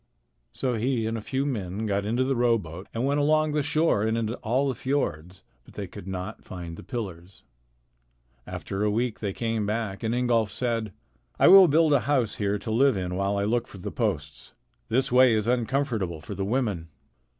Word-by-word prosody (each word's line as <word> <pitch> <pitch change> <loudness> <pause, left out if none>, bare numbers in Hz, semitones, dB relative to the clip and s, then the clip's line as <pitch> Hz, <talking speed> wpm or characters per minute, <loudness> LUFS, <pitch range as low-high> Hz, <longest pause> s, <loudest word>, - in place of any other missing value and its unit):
So 130 -2 -2
he 120 0 0
and 110 +1 -2
a 115 - -4
few 135 +6 -2
men 105 -6 -3
got 100 -1 0
into 120 +4 +1
the 135 +1 0
rowboat 105 -8 0
and 115 +3 -2
went 140 +1 +1
along 155 +1 +3
the 150 0 +1
shore 150 -5 +2
and 110 +1 +1
into 115 0 -1
all 125 +5 0
the 135 - 0
fiords, 95 - -3 0.2
but - - -18
they - - -4
could 90 - -11
not 95 +3 -5
find 85 -4 -7
the - - -10
pillars. 95 -7 -7 1.0
After 100 +1 -4
a 105 - +2
week 115 +2 -1
they 100 -3 -2
came 115 0 -2
back, 105 -3 -2
and 115 +1 -1
Ingolf 120 -3 +2
said: 115 -1 -2 0.5
"I - - +6
will 190 0 +10
build 155 0 +4
a 140 - +5
house 130 -7 +1
here 100 0 0
to 110 +2 -5
live 130 0 +3
in 90 -1 -3
while 100 +2 0
I 100 - 0
look 120 +3 0
for - - -12
the 90 - -6
posts. 75 0 -3 0.3
This 130 +3 +1
way 125 -2 +6
is 105 -1 0
uncomfortable 120 - 0
for 100 +6 -8
the 95 0 -3
women." 105 -7 -1
115 Hz, 200 wpm, -26 LUFS, 100-130 Hz, 1.0 s, will